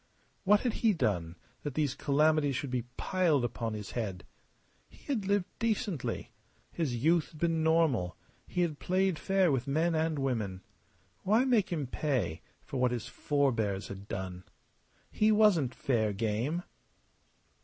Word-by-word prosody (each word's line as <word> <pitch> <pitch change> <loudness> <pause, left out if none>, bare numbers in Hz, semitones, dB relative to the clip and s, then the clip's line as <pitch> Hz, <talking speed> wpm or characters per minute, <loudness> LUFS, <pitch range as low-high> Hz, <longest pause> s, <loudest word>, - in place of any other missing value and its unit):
What 205 +2 +5
had 245 -4 0
he 225 -2 +4
done 90 - -1 0.3
that 145 -3 -5
these 150 -4 +1
calamities 150 -1 +2
should 130 +1 -3
be 125 -2 -1
piled 165 -9 +2
upon 115 -2 -3
his 105 -2 -6
head? 100 -7 -4 0.6
He - - -19
had 220 -9 -1
lived 200 -2 +2
decently; 215 - -2 0.4
his 150 -8 -1
youth 160 +7 +2
had 155 - -12
been 165 -1 +1
normal; 155 - +2 0.3
he 180 - -1
had 160 -4 -1
played 185 -2 +1
fair 190 -2 +2
with 130 -1 -1
men 160 +5 +1
and 160 -1 0
women. 110 -9 -2 0.6
Why 220 +6 +3
make 230 -6 +3
him 155 -5 -1
pay 125 - -1 0.2
for - - -5
what 125 - +4
his 120 -3 -3
forbears 115 -9 0
had 100 +1 -8
done? 95 -2 -5 0.7
He 215 +1 +3
wasn't 195 - +4
fair 110 -5 +1
game. 115 - -1
145 Hz, 150 wpm, -31 LUFS, 115-175 Hz, 0.7 s, What